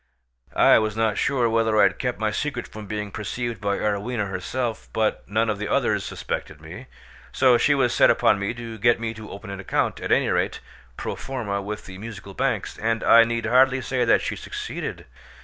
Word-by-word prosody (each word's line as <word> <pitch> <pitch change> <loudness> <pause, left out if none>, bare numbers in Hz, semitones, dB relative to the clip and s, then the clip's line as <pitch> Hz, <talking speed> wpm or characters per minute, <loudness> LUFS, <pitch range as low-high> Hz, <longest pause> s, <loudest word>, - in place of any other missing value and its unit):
I - - +6
was 110 -1 -2
not 110 -2 +1
sure 130 -4 +2
whether 110 -1 +2
I - - +7
had 95 -1 +2
kept 125 -1 -2
my 110 0 0
secret 130 +2 -3
from 105 -1 -10
being 105 0 -4
perceived 115 +3 -4
by 100 -1 0
Arowhena 105 +1 -1
herself, 110 +5 -4
but 110 -1 0
none 110 +2 +1
of 105 -2 -1
the 105 - -3
others - - +1
suspected - - -5
me, - - -10 0.4
so 130 -2 +4
she 145 - +3
was 130 -3 +2
set - - +5
upon 100 - +3
me 100 +4 -2
to 115 -2 -8
get 120 +2 +3
me 115 -1 -3
to 110 -1 -10
open 100 0 -8
an 100 - -6
account, 100 - -1
at - - -4
any - - +3
rate - - 0 0.4
pro - - -4
formâ, 105 -7 -4
with 105 +1 -6
the 95 0 -10
Musical 105 -2 -9
Banks; - - -2
and 115 +1 0
I 115 0 +8
need 115 0 -2
hardly 130 +3 +4
say 130 -1 -1
that 115 - +3
she - - -2
succeeded. - - -6
110 Hz, 205 wpm, -24 LUFS, 105-120 Hz, 0.4 s, I